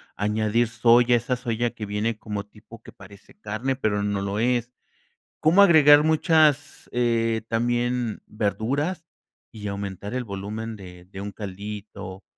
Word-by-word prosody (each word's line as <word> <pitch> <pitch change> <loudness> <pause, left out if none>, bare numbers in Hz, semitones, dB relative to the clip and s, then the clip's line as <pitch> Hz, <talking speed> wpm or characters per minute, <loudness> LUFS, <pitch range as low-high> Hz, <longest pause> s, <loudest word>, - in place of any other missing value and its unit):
añadir 110 +3 +1
soya, 120 +1 +4
esa 120 +2 0
soya 120 -1 -2
que 110 -3 -7
viene 105 +2 -2
como 105 -2 -5
tipo 110 +2 -16
que - - -13
parece 100 +1 -16
carne, 110 +6 -3
pero 105 -5 -1
no 100 -1 -1
lo 100 +1 -2
es, 120 0 0 0.7
¿cómo 175 +6 +5
agregar 150 -5 +7
muchas, 155 -2 +2
eh 115 -2 +1
también 120 0 -1
verduras 120 - -2 0.5
y 105 -2 -6
aumentar 100 +2 -5
el 125 -1 -2
volumen 105 +3 -6
de 90 -3 -12
de 95 +1 -10
un 100 0 -5
caldito 100 -1 -8
110 Hz, 140 wpm, -24 LUFS, 105-125 Hz, 0.7 s, agregar